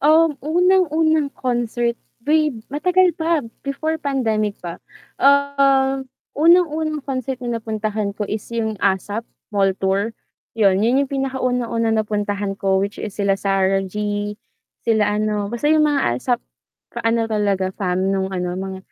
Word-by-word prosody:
Um, 310 +1 +4
unang-unang 320 -2 +3
concert 240 -1 -1 0.2
way 305 -1 +2 0.2
matagal 360 +4 +3
pa 325 -2 +1 0.2
before 315 +3 -2
pandemic 220 -8 0
pa. 170 0 -6 0.4
Ah, 275 -1 +4 0.4
unang-unang 315 -2 +3
concert 260 -1 -3
na 240 -1 -2
napuntahan 215 -2 -3
ko 210 - -2
is 210 +1 -4
yung 220 -3 -2
ASAP 200 +3 0 0.3
Mall 195 -2 +2
Tour, 200 +4 0 0.4
'yon. 195 -3 +4
'Yun 255 +6 +3
yung 270 - -12
pinakaunang-unang 250 -4 0
napuntahan 205 -2 -2
ko 195 -1 +1
which 200 +1 -2
is 210 - -4
sila 200 -1 +2
Sarah 195 -1 +1
G, 205 +1 -3 0.5
sila 210 -2 +2
ano 210 -1 -1
basta 240 +5 -2
yung 310 0 +5
mga 290 -2 +2 0.2
ASAP - - 0 0.5
ka-ano 230 0 +1
talaga 200 -3 0 0.3
nung 190 0 0
ano 180 -1 -2
mga 190 0 -5
230 Hz, 135 wpm, -21 LUFS, 205-280 Hz, 0.5 s, yung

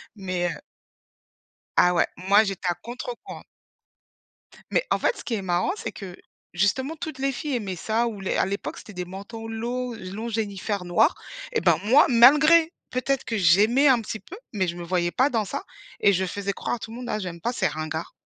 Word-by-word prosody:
Mais 185 -3 -2
heu - - -10 1.2
Ah 180 0 +5
ouais, 170 - +3 0.2
moi 205 +2 +6
j'étais 195 -2 -3
à 175 - +1
contre-courant. 240 - -8 1.3
Mais - - +2
en - - +3
fait 480 - +1
ce - - -10
qui 240 - -2
est 205 - -2
marrant 180 - 0
c'est - - -5
que, 185 -3 -9 0.4
justement 260 - 0
toutes 315 -2 -6
les 275 +1 0
filles 280 +2 -3
aimaient 200 -6 -4
ça 225 +6 0
ou 215 -4 -5
les 190 - -1
à - - +3
l'époque 200 +2 -4
c'était 215 - -11
des 180 -2 -4
manteaux 200 +5 -8
lo 240 +2 -3
longs 210 +2 -6
Jennyfer 205 -3 -2
noirs 175 - +3 0.4
et 455 - +1
ben - - +4
moi 260 +8 +6
malgré, 305 +7 +6 0.2
peut-être 255 +1 -1
que 225 - -2
j'aimais 210 - +5
un 255 -3 +5
petit 220 0 -5
peu, 375 - -11 0.2
mais 190 -4 0
je 170 - -3
me 175 - -6
voyais 175 0 0
pas 260 +9 +2
dans 225 -4 0
ça - - -4 0.4
et 200 - +5
je 190 0 0
faisais 200 +2 -3
croire 200 - -3
à - - -10
tout 225 0 -8
monde: 245 +1 -7
«Ah - - -1
j'aime 180 -4 -6
pas 240 - -1
c'est - - +1
ringards». 155 +2 -5
215 Hz, 205 wpm, -25 LUFS, 185-250 Hz, 1.3 s, moi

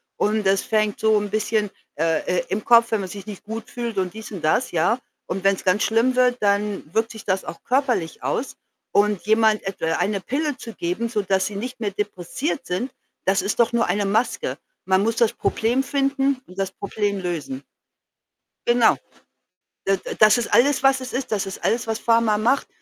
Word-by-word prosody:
und 210 0 0
das 195 0 +3
fängt 215 -4 0
so 220 -1 +3
'n 205 0 -4
bisschen, 215 0 0 0.3
äh 160 +1 +1 0.2
äh, 170 - -4
im 205 +2 -2
Kopf 235 -1 +6
wenn 215 -2 +1
man 185 - -5
sich 200 +1 -9
nicht 205 -3 -8
gut 225 +1 -6
fühlt 235 -4 -4
und 185 0 -2
dies 220 0 -8
und 185 -5 -6
das, 155 +11 +2
ja, 175 +9 +2 0.3
und 190 +1 -3
wenn's 195 -1 +2
ganz 185 +3 +2
schlimm 230 +3 +2
wird, 250 -1 +3
dann 205 0 +1
wirkt 225 +1 +1
sich 220 -2 -9
das 190 -1 0
auch 170 - -8
körperlich 245 - 0
aus 265 - -2 0.4
und 205 -2 +2
jemand 220 -1 +4
etwa 195 -4 -4
eine 200 -2 0
Pille 285 - -2
zu 230 -2 -9
geben, 180 +7 -2
sodass 195 -4 0
sie 205 - -5
nicht 250 +4 -5
mehr 205 -3 -1
depressiv 210 - -3
sind, 190 +9 -2 0.3
das 195 +1 +3
ist 205 - -2
doch 235 0 +3
nur 235 -1 +3
eine 205 0 0
Maske. 220 +5 0 0.3
Man 190 +1 +3
muss 230 +1 0
das 235 -2 +3
Problem 240 +4 0
finden 275 -1 0
und 185 - -15
das 195 - -1
Problem 200 -1 -2
lösen. 180 - -4 1.1
Genau. 240 -1 +5 0.9
D 195 0 +3
d - - -7
das 215 +2 +7
ist 235 - -3
alles, 275 +2 +4
was 270 -1 +4
es 255 - -7
ist. 255 -2 -3
Das 200 -2 0
ist 190 - -7
alles, 230 0 +1
was 225 0 -1
Pharma 230 -2 +3
macht, 245 +6 +1
215 Hz, 200 wpm, -23 LUFS, 195-240 Hz, 1.1 s, das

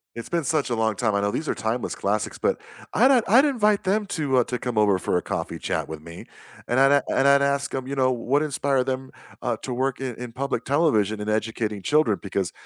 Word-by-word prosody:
It's 115 - -7
been 170 -2 0
such 150 -3 0
a - - +1
long 110 -2 0
time. 110 -4 0
I 100 - +1
know 100 - +1
these 155 +6 -3
are - - +1
timeless 115 +2 -2
classics, 105 +2 -2
but - - 0 0.3
I'd 250 0 +5
I'd 255 +8 +6
invite 215 -7 +2
them 205 +2 +1
to, 145 -8 0
uh, 125 - +5
to 125 - -3
come 120 -1 -4
over 100 -3 +4
for 90 - -1
a - - 0
coffee - - -4
chat - - -2
with 80 -1 -7
me, 85 +2 -10 0.4
and 120 +2 +1
I'd 140 +1 +5
and 140 - +2
I'd 140 0 +5
ask 140 0 0
'em, 130 - -3
you 140 - -4
know, 130 -1 +2
what 130 +4 0
inspired 140 -3 0
them, 130 0 -3 0.3
uh, - - -1
to 130 - -4
work 130 +1 -1
in 130 -3 -4
in 125 0 -7
public 140 +4 -3
television 110 - +1
and 105 - -3
educating 110 -1 -2
children 145 -7 +2
because 95 -3 -2
130 Hz, 235 wpm, -24 LUFS, 110-145 Hz, 0.4 s, I'd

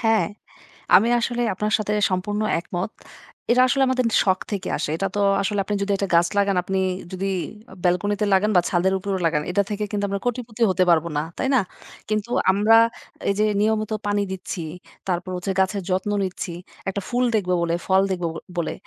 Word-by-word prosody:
হ্যাঁ, 225 -2 +3 0.7
আমি 220 +5 +5
আসলে 240 +1 -1
আপনার 210 +3 -2
সাথে 210 0 -1 0.2
সম্পূর্ণ 205 +3 -1 0.2
একমত। 180 +3 -4 0.6
এটা 250 +1 +5
আসলে 270 +1 +2
আমাদের 255 -2 +1 0.2
শখ 190 -1 +2
থেকে 200 -2 -3
আসে। - - -3
এটা 195 - 0
তো - - 0 0.2
আসলে 205 +1 -1
আপনি 205 +2 -2
যদি 200 0 -1
১ - - -5
টা - - 0
গাছ 170 +1 +5
লাগান 200 -1 +3
আপনি 190 +1 -1 0.3
যদি 190 +1 -3 0.4
অ - - -10
ব্যালকনি 180 +3 +2
তে - - +3
লাগান 205 +3 +3
বা - - +6
ছাদের 185 +1 +2
উপরেও 195 0 -2
লাগান 155 -2 +2
এটা 200 - +3
থেকে 210 0 -2
কিন্তু 205 -1 -1
আমরা 200 0 -2
কোটিপতি 240 -2 -3
হতে 185 0 +2
পারব 165 -1 +4
না। - - +2 0.2
তাই - - -1
না? - - +5 0.5
কিন্তু 215 +1 -1 0.2
আমরা 210 +4 +5 0.5
এই - - +3
যে 215 - +4 0.2
নিয়মিত 215 0 +1 0.2
পানি 205 0 +1
দিচ্ছি, 185 -2 -5 0.4
তারপর 180 0 -2
হচ্ছে 180 +2 -3
গাছের 190 +1 +1
যত্ন 190 +3 0
নিচ্ছি। 185 -2 -4 0.4
১ - - -4
টা - - 0
ফুল 245 0 +1
দেখব 195 -4 0
বলে, 170 0 +1
ফল 190 0 +4
দেখব, 180 -2 -2
ব - - -4 0.2
বলে। 170 - -1
200 Hz, 200 wpm, -23 LUFS, 185-215 Hz, 0.7 s, বা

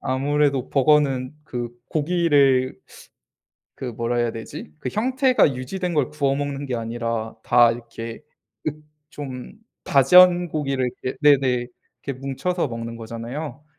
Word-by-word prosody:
아무래도 140 0 0
버거는 140 -1 +2
그 120 -3 -4 0.2
고기를 145 -5 +2 0.9
그 - - -8
뭐라 120 0 -2
해야 120 -1 +1
되지? 110 -8 -8
그 - - -4
형태가 255 - +2
유지된 175 +8 -4
걸 145 -3 +1
구워 140 -2 0
먹는 145 0 -3
게 125 - -3
아니라 115 -1 -3
다 120 -1 +5
이렇게 115 0 -8 0.5
으 - - -2 0.4
좀 130 -2 -8 0.3
다전 175 +6 +6
고기를 135 -5 -1
이렇게 130 - -3
네네. 130 -4 +4 0.4
이렇게 135 -2 -5
뭉쳐서 150 +5 -2
먹는 115 0 -6
거잖아요. 120 +6 -7
135 Hz, 270 characters per minute, -23 LUFS, 120-150 Hz, 0.9 s, 다전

